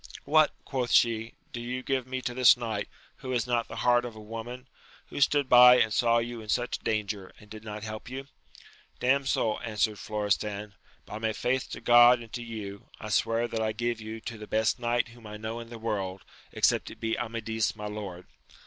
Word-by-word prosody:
What! 155 Hz, 0 st, +5 dB
quoth 125 Hz, -3 st, -2 dB
she, 115 Hz, -1 st, +3 dB, 0.2 s
do 120 Hz, -, -4 dB
you 125 Hz, +2 st, -4 dB
give 130 Hz, -2 st, -1 dB
me 130 Hz, 0 st, -4 dB
to 125 Hz, -, -2 dB
this 125 Hz, 0 st, +6 dB
knight, 115 Hz, -2 st, -3 dB, 0.3 s
who 130 Hz, -, -8 dB
has 120 Hz, -2 st, +1 dB
not 120 Hz, -2 st, 0 dB
the -, -, -8 dB
heart 120 Hz, 0 st, +5 dB
of 120 Hz, -2 st, -7 dB
a -, -, -10 dB
woman 115 Hz, +4 st, -7 dB, 0.2 s
% -, -, -25 dB
who -, -, -5 dB
stood 145 Hz, 0 st, +3 dB
by 125 Hz, 0 st, +9 dB
and 110 Hz, -2 st, +2 dB
saw 115 Hz, -1 st, +3 dB
you 120 Hz, 0 st, -3 dB
in 110 Hz, -, -12 dB
such 120 Hz, +2 st, 0 dB
danger, 105 Hz, -3 st, -2 dB
and 105 Hz, -, -18 dB
did 110 Hz, 0 st, -9 dB
not 105 Hz, -1 st, -7 dB
help 110 Hz, +1 st, -7 dB
you? 135 Hz, +2 st, -6 dB, 0.7 s
Damsel, 130 Hz, -4 st, +1 dB
answered 110 Hz, -2 st, 0 dB
Florestan, 105 Hz, 0 st, -2 dB, 0.3 s
by 105 Hz, -, -7 dB
my 110 Hz, 0 st, -1 dB
faith 130 Hz, +4 st, -1 dB
to -, -, -7 dB
God 120 Hz, 0 st, +7 dB
and 115 Hz, -2 st, -12 dB
to 120 Hz, -, -4 dB
you, 105 Hz, -4 st, -7 dB
I 110 Hz, -, -7 dB
swear 115 Hz, +2 st, +1 dB
that 110 Hz, -, -2 dB
I 110 Hz, 0 st, 0 dB
give 120 Hz, 0 st, -2 dB
you 110 Hz, +1 st, -6 dB
to 115 Hz, -1 st, -7 dB
the 105 Hz, -, -9 dB
best 110 Hz, +2 st, +1 dB
knight 120 Hz, 0 st, 0 dB
whom 115 Hz, -1 st, -14 dB
I 105 Hz, 0 st, -7 dB
know 110 Hz, +2 st, -5 dB
in 115 Hz, 0 st, -9 dB
the 120 Hz, -, -8 dB
world, 100 Hz, -4 st, -3 dB, 0.3 s
except -, -, +2 dB
it -, -, -12 dB
be 115 Hz, 0 st, -1 dB
Amadis 115 Hz, -2 st, -2 dB
my 105 Hz, -1 st, -7 dB
lord. 100 Hz, -4 st, -6 dB
115 Hz, 210 wpm, -28 LUFS, 110-120 Hz, 0.7 s, by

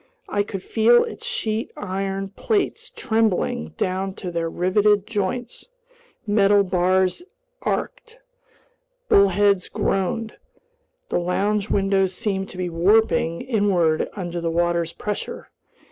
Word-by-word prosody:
I 205 Hz, -, 0 dB
could 195 Hz, -2 st, -5 dB
feel 235 Hz, +2 st, +4 dB
its 460 Hz, +3 st, -7 dB
sheet 225 Hz, -, -2 dB
iron 195 Hz, 0 st, -3 dB
plates 400 Hz, -, -1 dB
trembling 220 Hz, -, 0 dB
down 190 Hz, +1 st, -2 dB
to 180 Hz, -3 st, -6 dB
their 165 Hz, -1 st, -2 dB
riveted 200 Hz, +4 st, +2 dB
joins; 225 Hz, +3 st, -3 dB, 0.6 s
metal 205 Hz, -1 st, +4 dB
bars 185 Hz, -, +1 dB, 0.4 s
arched; 485 Hz, -2 st, -3 dB, 0.9 s
bulkheads 200 Hz, -1 st, +4 dB
groaned; 195 Hz, +4 st, -1 dB, 0.7 s
the -, -, +1 dB
lounge 200 Hz, +4 st, 0 dB
windows 195 Hz, -1 st, +1 dB
seemed 195 Hz, -3 st, -2 dB
to -, -, -11 dB
be 180 Hz, -1 st, -2 dB
warping 170 Hz, -1 st, +2 dB
inward 190 Hz, -9 st, +1 dB
under 175 Hz, -3 st, -4 dB
the 165 Hz, -, -1 dB
water's 170 Hz, 0 st, 0 dB
pressure. 210 Hz, +3 st, -5 dB
195 Hz, 115 wpm, -22 LUFS, 180-210 Hz, 0.9 s, feel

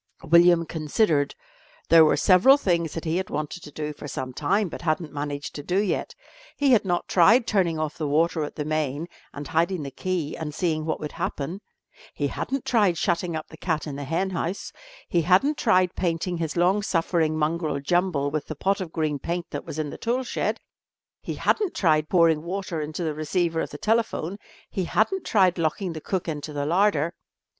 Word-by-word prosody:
William 170 Hz, +1 st, +6 dB
considered. 155 Hz, -1 st, 0 dB, 0.5 s
There 165 Hz, 0 st, +8 dB
were 155 Hz, -, +4 dB
several 205 Hz, +9 st, +6 dB
things 170 Hz, -, 0 dB
that 165 Hz, -, -5 dB
he 160 Hz, +2 st, 0 dB
had 185 Hz, 0 st, -3 dB
wanted 150 Hz, +4 st, -4 dB
to 150 Hz, -, -11 dB
do 150 Hz, 0 st, -4 dB
for 145 Hz, -, -9 dB
some 130 Hz, -2 st, -5 dB
time, 195 Hz, +10 st, +1 dB
but 165 Hz, -, -8 dB
hadn't 155 Hz, -1 st, -1 dB
managed 145 Hz, -1 st, -4 dB
to 145 Hz, -, -6 dB
do 180 Hz, +5 st, -1 dB
yet. 200 Hz, -1 st, -1 dB, 0.4 s
He 280 Hz, -2 st, +3 dB
had 230 Hz, -5 st, +5 dB
not 175 Hz, -2 st, -1 dB
tried 220 Hz, +8 st, +5 dB
turning 185 Hz, -7 st, +1 dB
off 155 Hz, +1 st, -3 dB
the 155 Hz, -, -1 dB
water 160 Hz, +2 st, +1 dB
at 150 Hz, -, -6 dB
the 150 Hz, -, -3 dB
main, 155 Hz, 0 st, -1 dB, 0.2 s
and 145 Hz, -1 st, -7 dB
hiding 170 Hz, +2 st, 0 dB
the 140 Hz, -, -6 dB
key 175 Hz, +1 st, -3 dB
and 150 Hz, -2 st, -5 dB
seeing 155 Hz, -4 st, -1 dB
what 160 Hz, -, -2 dB
would 150 Hz, -, -5 dB
happen; 165 Hz, +8 st, -4 dB, 0.5 s
he -, -, -1 dB
hadn't 275 Hz, -1 st, -3 dB
tried 205 Hz, -8 st, +3 dB
shutting 170 Hz, +1 st, 0 dB
up 155 Hz, -, -5 dB
the 160 Hz, -, -12 dB
cat 160 Hz, -3 st, -2 dB
in 145 Hz, -3 st, -5 dB
the 145 Hz, -, -5 dB
hen 170 Hz, +7 st, -1 dB
house; 180 Hz, +2 st, -3 dB, 0.3 s
he 170 Hz, -, +2 dB
hadn't 195 Hz, -, +3 dB
tried 185 Hz, -6 st, +3 dB
painting 175 Hz, 0 st, -1 dB
his 165 Hz, 0 st, -3 dB
long 185 Hz, +4 st, +3 dB
suffering 165 Hz, -4 st, 0 dB
mongrel 155 Hz, -1 st, 0 dB
Jumble 155 Hz, -2 st, 0 dB
with 155 Hz, -1 st, -3 dB
the 155 Hz, -, -5 dB
pot 195 Hz, +6 st, 0 dB
of 175 Hz, -4 st, -5 dB
green 155 Hz, -3 st, -1 dB
paint 170 Hz, +4 st, -3 dB
that 145 Hz, -, -5 dB
was -, -, -7 dB
in 150 Hz, -2 st, -2 dB
the -, -, -9 dB
tool 245 Hz, +3 st, 0 dB
shed; -, -, -2 dB, 0.6 s
he -, -, -5 dB
hadn't 410 Hz, -5 st, 0 dB
tried 155 Hz, -4 st, +2 dB
pouring 165 Hz, -4 st, +4 dB
water 175 Hz, -1 st, -4 dB
into 155 Hz, +3 st, -4 dB
the 155 Hz, -2 st, -1 dB
receiver 165 Hz, +2 st, 0 dB
of -, -, -4 dB
the 145 Hz, -, -8 dB
telephone; 215 Hz, -3 st, 0 dB, 0.3 s
he 190 Hz, -, -3 dB
hadn't 345 Hz, -, +1 dB
tried 185 Hz, -5 st, +3 dB
locking 165 Hz, +3 st, -1 dB
the 155 Hz, -, -7 dB
cook 185 Hz, +1 st, -2 dB
into 150 Hz, -1 st, -4 dB
the 145 Hz, -1 st, -2 dB
larder. 170 Hz, -1 st, +2 dB
165 Hz, 200 wpm, -25 LUFS, 155-185 Hz, 0.6 s, There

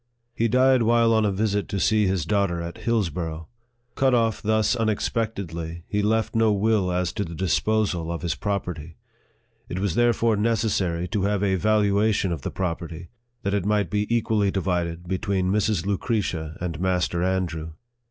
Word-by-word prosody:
He 115 Hz, -, +1 dB
died 130 Hz, +2 st, +4 dB
while 115 Hz, 0 st, +4 dB
on 110 Hz, -1 st, +3 dB
a -, -, +1 dB
visit 100 Hz, +1 st, 0 dB
to 100 Hz, -, -2 dB
see 105 Hz, +1 st, +3 dB
his 95 Hz, -5 st, 0 dB
daughter 100 Hz, -3 st, +1 dB
at 85 Hz, 0 st, -6 dB
Hillsborough. 85 Hz, -8 st, -2 dB, 0.5 s
Cut 130 Hz, -2 st, +2 dB
off 115 Hz, -2 st, +1 dB
thus 110 Hz, +1 st, +2 dB
unexpectedly, 100 Hz, -7 st, -2 dB
he 105 Hz, -, 0 dB
left 110 Hz, +2 st, +1 dB
no 115 Hz, -1 st, +4 dB
will 105 Hz, -2 st, +1 dB
as 90 Hz, -1 st, -1 dB
to 105 Hz, -, -2 dB
the 85 Hz, -2 st, -7 dB
disposal 90 Hz, 0 st, 0 dB
of 85 Hz, -, -5 dB
his 85 Hz, -4 st, 0 dB
property. 85 Hz, -2 st, -4 dB, 0.7 s
It 90 Hz, -, -4 dB
was 95 Hz, -2 st, 0 dB
there 120 Hz, +4 st, +4 dB
fore 115 Hz, -1 st, +1 dB
necessary 100 Hz, -6 st, 0 dB
to 100 Hz, +1 st, 0 dB
have 105 Hz, -1 st, 0 dB
a 95 Hz, -1 st, +2 dB
valuation 105 Hz, 0 st, +2 dB
of 80 Hz, -5 st, -3 dB
the -, -, -3 dB
property, 85 Hz, -2 st, -4 dB, 0.3 s
that 100 Hz, -, -1 dB
it 100 Hz, -3 st, +1 dB
might 105 Hz, -3 st, 0 dB
be 105 Hz, 0 st, 0 dB
equally 110 Hz, -3 st, +1 dB
divided 90 Hz, -3 st, -2 dB
between 95 Hz, 0 st, 0 dB
Mrs. 105 Hz, -3 st, +1 dB
Lucretia 95 Hz, -6 st, -2 dB
and 85 Hz, -2 st, -4 dB
Master 90 Hz, -2 st, 0 dB
Andrew. 85 Hz, -4 st, -1 dB
100 Hz, 170 wpm, -24 LUFS, 85-110 Hz, 0.7 s, died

